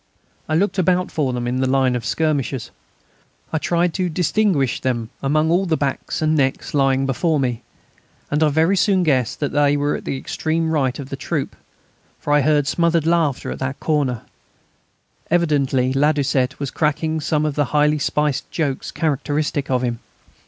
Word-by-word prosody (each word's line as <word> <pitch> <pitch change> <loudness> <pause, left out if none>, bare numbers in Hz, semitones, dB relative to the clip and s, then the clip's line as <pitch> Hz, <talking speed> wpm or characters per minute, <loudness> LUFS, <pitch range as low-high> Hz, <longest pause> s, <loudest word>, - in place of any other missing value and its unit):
I 155 - +1
looked 195 +3 +1
about 180 0 +1
for 140 -5 0
them 120 -1 -3
in 125 +1 -1
the 130 - +1
line 130 -2 +2
of 120 - -3
skirmishers. 140 -6 -1 0.8
I 160 - +1
tried 170 +1 +1
to 185 -2 -1
distinguish 175 - +1
them 120 -3 -2
among 155 +3 +1
all 185 +3 +2
the 160 -2 +1
backs 140 +2 -2
and 155 0 +2
necks 135 -3 0
lying 135 -1 +2
before 150 +3 0
me. 125 -4 -1 0.7
And 150 +2 +1
I 155 - +4
very 160 +6 +2
soon 190 -1 +2
guessed 130 -7 +1
that 145 - -1
they 145 0 +3
were 145 +1 0
at - - -7
the 135 - -2
extreme 160 +4 -2
right 135 -5 0
of 140 -2 -7
the 135 - -4
troop, - - -3 0.6
for 145 - -2
I 150 - +5
heard 150 0 +2
smothered 170 +1 +1
laughter 165 -5 +1
at - - -6
that 130 +1 -3
corner; 140 -7 0 1.1
evidently 140 -6 +1
Ladoucette 140 -2 +1
was 140 -2 -3
cracking 155 +1 0
some 150 0 0
of 150 - -1
the 145 0 +1
highly 150 +2 +2
spiced 150 -1 -1
jokes 145 -5 -2
characteristic 145 -1 -1
of 130 -1 +1
him. 120 -2 -2
145 Hz, 175 wpm, -20 LUFS, 135-160 Hz, 1.1 s, I